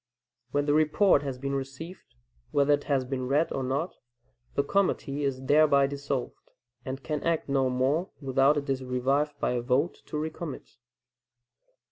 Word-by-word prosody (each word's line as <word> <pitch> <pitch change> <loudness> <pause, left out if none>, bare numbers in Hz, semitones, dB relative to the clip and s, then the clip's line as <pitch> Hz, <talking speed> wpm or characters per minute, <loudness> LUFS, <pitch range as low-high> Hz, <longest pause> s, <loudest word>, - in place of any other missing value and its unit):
When 145 +3 0
the 145 - +2
report 155 +2 +4
has 135 -3 -4
been 140 +1 -3
received, 140 +7 -7 0.3
whether 145 0 +3
it 145 - 0
has 135 -3 +1
been 130 -1 -3
read 145 +5 +1
or 135 - -2
not, 135 +7 -2 0.6
the 140 - +2
committee 145 -5 0
is 135 -2 -2
thereby 145 0 +5
dissolved, 140 -2 -4 0.3
and 135 +1 -6
can 150 -2 -2
act 165 -1 0
no 135 -2 +2
more 135 +8 +1
without 135 +1 +3
it 145 0 -2
is 135 -1 -1
revived 135 +4 0
by - - 0
a 125 -1 0
vote 135 +7 0
to 150 - -4
recommit. 155 -1 -6
140 Hz, 160 wpm, -28 LUFS, 135-150 Hz, 0.6 s, thereby